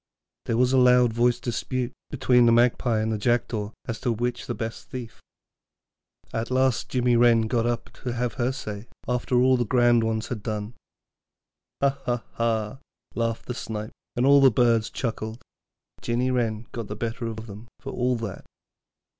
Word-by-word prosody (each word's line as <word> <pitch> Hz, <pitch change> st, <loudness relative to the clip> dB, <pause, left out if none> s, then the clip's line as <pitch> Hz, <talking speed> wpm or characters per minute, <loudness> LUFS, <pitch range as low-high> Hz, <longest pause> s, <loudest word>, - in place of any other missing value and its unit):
There 115 Hz, -, +1 dB
was 125 Hz, +1 st, +3 dB
a 130 Hz, -, +5 dB
loud 125 Hz, -2 st, +5 dB
voiced 120 Hz, +1 st, +2 dB
dispute 125 Hz, +1 st, -2 dB, 0.2 s
between 125 Hz, -3 st, +4 dB
the -, -, +6 dB
Magpie 120 Hz, -1 st, +3 dB
and 110 Hz, +1 st, -1 dB
the 110 Hz, -, -1 dB
Jackdaw 115 Hz, -2 st, 0 dB, 0.2 s
as 115 Hz, -, -4 dB
to 120 Hz, -, +1 dB
which 120 Hz, +2 st, -1 dB
was -, -, -9 dB
the -, -, -2 dB
best 115 Hz, 0 st, -6 dB
thief. 125 Hz, -5 st, -7 dB, 1.1 s
At 115 Hz, +1 st, -2 dB
last 130 Hz, -2 st, +1 dB
little 125 Hz, -2 st, -1 dB
Jinny 120 Hz, -1 st, +4 dB
Wren 120 Hz, -1 st, +5 dB
got 115 Hz, +1 st, 0 dB
up 120 Hz, -1 st, -3 dB
to 125 Hz, -2 st, -3 dB
have 120 Hz, 0 st, -1 dB
her 125 Hz, 0 st, 0 dB
say, 110 Hz, -4 st, -6 dB, 0.2 s
after 125 Hz, +1 st, 0 dB
all 130 Hz, +1 st, +4 dB
the 120 Hz, -, +1 dB
grand 120 Hz, 0 st, +3 dB
ones 110 Hz, 0 st, -1 dB
had 115 Hz, -4 st, -4 dB
done. 105 Hz, 0 st, -4 dB, 1.1 s
'Ha, 140 Hz, 0 st, +2 dB
ha, 120 Hz, -1 st, 0 dB
ha,' 115 Hz, +1 st, -1 dB, 0.3 s
laughed 115 Hz, -1 st, -2 dB
the 125 Hz, -, -4 dB
Snipe, 110 Hz, -2 st, -5 dB, 0.2 s
and 120 Hz, -, +1 dB
all 140 Hz, 0 st, +7 dB
the 135 Hz, -, +8 dB
birds 115 Hz, -2 st, +2 dB
chuckled; 110 Hz, -1 st, -4 dB, 0.5 s
but -, -, -16 dB
Jinny 120 Hz, +2 st, +1 dB
Wren 115 Hz, -3 st, -1 dB
got 115 Hz, -3 st, -5 dB
the 105 Hz, -, -5 dB
better 115 Hz, +1 st, -3 dB
of 110 Hz, 0 st, -6 dB
them 105 Hz, +1 st, -10 dB
for -, -, -7 dB
all 125 Hz, 0 st, 0 dB
that. 115 Hz, -5 st, -5 dB
120 Hz, 185 wpm, -25 LUFS, 115-125 Hz, 1.1 s, the